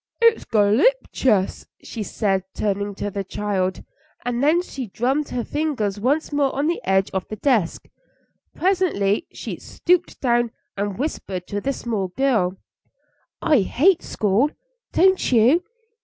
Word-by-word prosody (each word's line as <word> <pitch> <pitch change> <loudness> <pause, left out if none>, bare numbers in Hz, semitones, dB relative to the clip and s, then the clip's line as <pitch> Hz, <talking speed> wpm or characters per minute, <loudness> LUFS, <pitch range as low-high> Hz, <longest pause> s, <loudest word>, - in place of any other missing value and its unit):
"It's 460 -1 +4
golloptious," 215 - +2 0.2
she 225 - -6
said, 195 -2 0
turning 200 -1 -1
to 205 +1 -4
the 200 0 -3
child, 190 -1 -2 0.4
and 245 0 -1
then 330 +5 +4
she 265 -8 -6
drummed 265 +8 -1
her 245 - -2
fingers 255 -11 -2
once 285 +7 0
more 285 -2 +1
on 280 +2 0
the 340 +2 0
edge 190 0 +1
of 190 -1 -3
the 215 - -5
desk. 215 -7 0 0.7
Presently 340 - +1
she - - -6
stooped 355 0 0
down 240 -2 +2 0.3
and 200 -1 -3
whispered 200 - -4
to 205 0 -2
this 275 +3 -2
small 215 -5 -1
girl: 195 -4 +1 0.9
"I 305 -5 +4
hate 315 - +3
school; 215 +7 +1 0.4
don't 375 -3 +3
you?" 250 +9 +5
235 Hz, 140 wpm, -22 LUFS, 200-295 Hz, 0.9 s, you